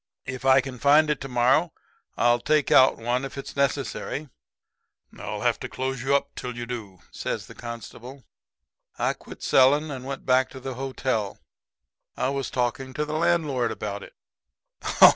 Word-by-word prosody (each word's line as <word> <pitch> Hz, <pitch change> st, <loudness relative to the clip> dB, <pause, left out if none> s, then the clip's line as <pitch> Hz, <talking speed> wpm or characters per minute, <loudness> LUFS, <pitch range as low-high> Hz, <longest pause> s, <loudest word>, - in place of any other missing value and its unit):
If 130 Hz, -1 st, -6 dB
I 135 Hz, 0 st, +6 dB
can 130 Hz, -2 st, -8 dB
find 150 Hz, +3 st, +5 dB
it 150 Hz, -, -2 dB
to 135 Hz, -, -4 dB
morrow 130 Hz, +6 st, +3 dB, 0.5 s
I'll 120 Hz, +1 st, +4 dB
take 150 Hz, +2 st, +1 dB
one 130 Hz, -3 st, +5 dB
out 125 Hz, +2 st, +1 dB
if 135 Hz, 0 st, -6 dB
it's 140 Hz, -, -7 dB
necessary.' 140 Hz, +1 st, -1 dB, 0.9 s
"'I'll -, -, -5 dB
have -, -, +1 dB
to -, -, -5 dB
close 130 Hz, -1 st, -3 dB
you 135 Hz, +2 st, +2 dB
up 140 Hz, -, 0 dB
till 125 Hz, -1 st, -6 dB
you 120 Hz, -, -4 dB
do,' 110 Hz, -7 st, -7 dB
says -, -, -4 dB
the -, -, -12 dB
constable. 120 Hz, +3 st, -9 dB, 0.7 s
"I -, -, +1 dB
quit -, -, -12 dB
selling 145 Hz, +4 st, +4 dB
and 130 Hz, -2 st, -6 dB
went 135 Hz, +1 st, -6 dB
back 130 Hz, 0 st, +3 dB
to 130 Hz, -, -10 dB
the 130 Hz, 0 st, -5 dB
hotel. 130 Hz, -5 st, -2 dB, 0.8 s
I -, -, +1 dB
was 135 Hz, -2 st, -2 dB
talking 130 Hz, +1 st, -2 dB
to 150 Hz, -, 0 dB
the 150 Hz, -, -5 dB
landlord 155 Hz, -7 st, +1 dB
about 105 Hz, -2 st, -4 dB
it. -, -, -12 dB
130 Hz, 170 wpm, -25 LUFS, 125-140 Hz, 0.9 s, I